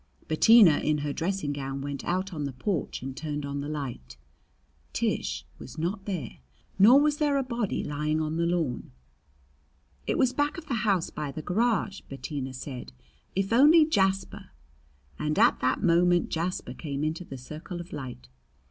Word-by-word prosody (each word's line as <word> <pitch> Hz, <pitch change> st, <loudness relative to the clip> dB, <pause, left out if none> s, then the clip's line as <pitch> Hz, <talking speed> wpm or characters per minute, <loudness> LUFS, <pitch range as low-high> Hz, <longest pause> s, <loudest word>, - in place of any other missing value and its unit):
Bettina 185 Hz, 0 st, +6 dB
in 150 Hz, 0 st, +1 dB
her 145 Hz, -, -2 dB
dressing 170 Hz, -3 st, -2 dB
gown 135 Hz, -1 st, -4 dB
went 140 Hz, 0 st, -5 dB
out 185 Hz, +2 st, -1 dB
on 150 Hz, -3 st, -3 dB
the 140 Hz, -, -3 dB
porch 150 Hz, +2 st, -3 dB
and 135 Hz, 0 st, -5 dB
turned 150 Hz, -1 st, -4 dB
on 140 Hz, 0 st, -3 dB
the 145 Hz, -, -5 dB
light. 120 Hz, -, -6 dB, 0.8 s
Tish -, -, -1 dB
was 125 Hz, -, -10 dB
not 185 Hz, +5 st, -2 dB
there, 175 Hz, -, -4 dB, 0.4 s
nor 235 Hz, +8 st, +8 dB
was 295 Hz, 0 st, +2 dB
there 290 Hz, -2 st, +2 dB
a 275 Hz, -, +1 dB
body 235 Hz, -5 st, -2 dB
lying 150 Hz, +1 st, -1 dB
on 155 Hz, 0 st, -2 dB
the 170 Hz, 0 st, +1 dB
lawn. 160 Hz, -, -2 dB, 1.1 s
"It -, -, +1 dB
was 255 Hz, -1 st, +3 dB
back 290 Hz, +4 st, 0 dB
of 335 Hz, -, -8 dB
the 280 Hz, -, -3 dB, 0.2 s
house 185 Hz, -4 st, +1 dB
by 150 Hz, -2 st, -4 dB
the 155 Hz, +3 st, -7 dB
garage," 210 Hz, +1 st, 0 dB
Bettina 135 Hz, -1 st, -5 dB
said. 125 Hz, -, -7 dB, 0.4 s
"If 195 Hz, +3 st, 0 dB
only 305 Hz, +6 st, +7 dB
Jasper 195 Hz, -5 st, 0 dB, 0.3 s
" 70 Hz, 0 st, -33 dB
And 150 Hz, 0 st, -1 dB
at -, -, +5 dB
that 130 Hz, +1 st, 0 dB
moment 175 Hz, 0 st, +3 dB
Jasper 165 Hz, -6 st, -3 dB
came 140 Hz, -1 st, -4 dB
into 160 Hz, +3 st, -2 dB
the 135 Hz, -6 st, -8 dB
circle 155 Hz, +7 st, -8 dB
of 175 Hz, +1 st, -9 dB
light. 125 Hz, -, -7 dB
160 Hz, 175 wpm, -27 LUFS, 140-195 Hz, 1.1 s, nor